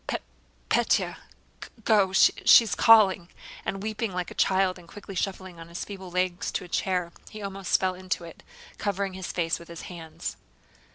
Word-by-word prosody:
"Pe... - - -1 0.5
Pétya... - - +2 0.7
Go, 210 -4 +5
go, - - -11
she... 195 - +6
is 225 - -3
calling..." 195 -6 +5 0.3
and 195 0 -4
weeping 220 0 -2
like 180 -1 -3
a - - -7
child 190 -1 +2
and 170 - -16
quickly 200 +3 -10
shuffling 185 -2 -4
on 165 - -10
his 170 +1 -6
feeble 190 -2 -8
legs 180 0 -1
to - - -2
a - - -11
chair, 180 -1 -1 0.2
he 215 - -9
almost 195 -2 0
fell 185 -1 0
into 185 -1 -4
it, 165 -1 -11 0.4
covering 200 -1 -2
his 185 -1 -5
face 165 -2 -1
with 170 - -13
his 170 -1 -9
hands. 160 -2 -7
185 Hz, 180 wpm, -27 LUFS, 175-195 Hz, 0.7 s, she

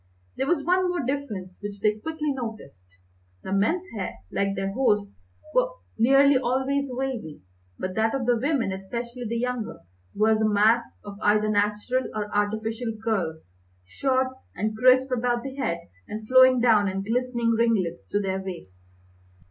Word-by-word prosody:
There 265 - -1
was 300 -2 +1
one 365 +3 +2
more 350 -7 -1
difference 215 -10 -4
which 205 -1 -6
they 210 +1 +1
quickly 310 +3 -2
noticed. 140 - -8 0.5
The 190 - -4
men's 320 - +1
hair, 195 -3 -4 0.2
like 195 0 0
their 195 0 -2
host's, 205 - 0 0.2
was - - +1 0.2
nearly 275 +3 +5
always 265 +3 0
wavy, 250 - -4 0.3
but 185 0 -4
that 220 +4 +1
of 265 -3 -2
the 245 0 +3
women, 260 -3 0
especially 235 +6 -5
the 230 +2 -2
younger, 250 -2 -3 0.3
was 220 +1 +3
a 215 - +3
mass 220 +3 +3
of 200 0 -8
either 210 +1 +3
natural 210 +5 0
or 210 -1 -3
artificial 220 +2 -1
curls, 160 - -2 0.3
short 260 - 0 0.3
and 215 +3 -2
crisp 255 +3 +4
about 240 -1 0
the 270 0 -6
head, 170 -11 -1 0.3
and 215 0 -6
flowing 255 0 +7
down 220 -4 +4
in 195 0 -2
glistening 235 +1 0
ringlets 225 -7 +1
to 205 - 0
their 190 -1 -2
waists. 90 - -11
225 Hz, 155 wpm, -25 LUFS, 200-255 Hz, 0.5 s, flowing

